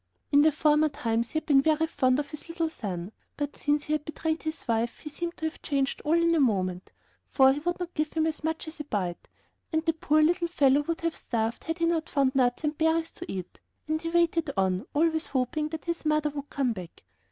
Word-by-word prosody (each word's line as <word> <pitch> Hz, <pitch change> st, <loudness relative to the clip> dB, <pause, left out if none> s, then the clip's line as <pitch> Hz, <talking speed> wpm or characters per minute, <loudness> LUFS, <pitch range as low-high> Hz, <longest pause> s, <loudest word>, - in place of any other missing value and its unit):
In 290 Hz, +2 st, +6 dB
former 305 Hz, 0 st, +3 dB
times 230 Hz, -4 st, -1 dB
he -, -, -16 dB
had 315 Hz, -, -2 dB
been 275 Hz, -3 st, +5 dB
very 315 Hz, +2 st, +2 dB
fond 255 Hz, -5 st, +2 dB
of 285 Hz, -1 st, -3 dB
his 305 Hz, +2 st, -9 dB
little 330 Hz, -1 st, -1 dB
son; 190 Hz, -, -5 dB, 0.3 s
but 290 Hz, -1 st, -3 dB
since 290 Hz, 0 st, 0 dB
he 300 Hz, -, -2 dB
had 305 Hz, -1 st, 0 dB
betrayed 315 Hz, +1 st, -2 dB
his 315 Hz, -3 st, -5 dB
wife 230 Hz, 0 st, 0 dB
he 300 Hz, -, -9 dB
seemed 340 Hz, +3 st, -4 dB
to 320 Hz, -, -4 dB
have 315 Hz, -, -4 dB
changed 275 Hz, -2 st, -1 dB
all 315 Hz, +2 st, +2 dB
in 335 Hz, 0 st, +3 dB
a 330 Hz, -, +3 dB
moment, 185 Hz, -8 st, 0 dB, 0.4 s
for 265 Hz, -1 st, +5 dB
he 285 Hz, -, -3 dB
would 350 Hz, +4 st, -2 dB
not 355 Hz, -1 st, -5 dB
give 305 Hz, -1 st, -1 dB
him 320 Hz, -1 st, +1 dB
as 315 Hz, -1 st, -2 dB
much 320 Hz, +1 st, -2 dB
as 315 Hz, 0 st, -9 dB
a -, -, -3 dB
bite, 185 Hz, -9 st, -3 dB, 0.4 s
and 320 Hz, 0 st, 0 dB
the 325 Hz, -, +3 dB
poor 310 Hz, -1 st, +2 dB
little 345 Hz, +2 st, +2 dB
fellow 285 Hz, -4 st, +3 dB
would 330 Hz, +3 st, -3 dB
have 335 Hz, -1 st, -1 dB
starved 225 Hz, -1 st, -2 dB
had 325 Hz, +1 st, -2 dB
he 335 Hz, -, +1 dB
not 330 Hz, -1 st, 0 dB
found 275 Hz, -2 st, +2 dB
some 270 Hz, -, -3 dB
nuts 245 Hz, +3 st, +1 dB
and 300 Hz, 0 st, -1 dB
berries 320 Hz, 0 st, +2 dB
to 350 Hz, -, -7 dB
eat, 185 Hz, -2 st, -6 dB, 0.3 s
and 315 Hz, 0 st, -1 dB
he 330 Hz, -, -3 dB
waited 335 Hz, -2 st, +2 dB
on, 190 Hz, -1 st, +1 dB
always 320 Hz, +1 st, +2 dB
hoping 275 Hz, +4 st, -1 dB
that 315 Hz, -2 st, -6 dB
his 340 Hz, -1 st, -2 dB
mother 305 Hz, -1 st, +1 dB
would 285 Hz, 0 st, -6 dB
come 265 Hz, -4 st, 0 dB
back. 180 Hz, -5 st, -10 dB
305 Hz, 240 wpm, -28 LUFS, 265-320 Hz, 0.4 s, In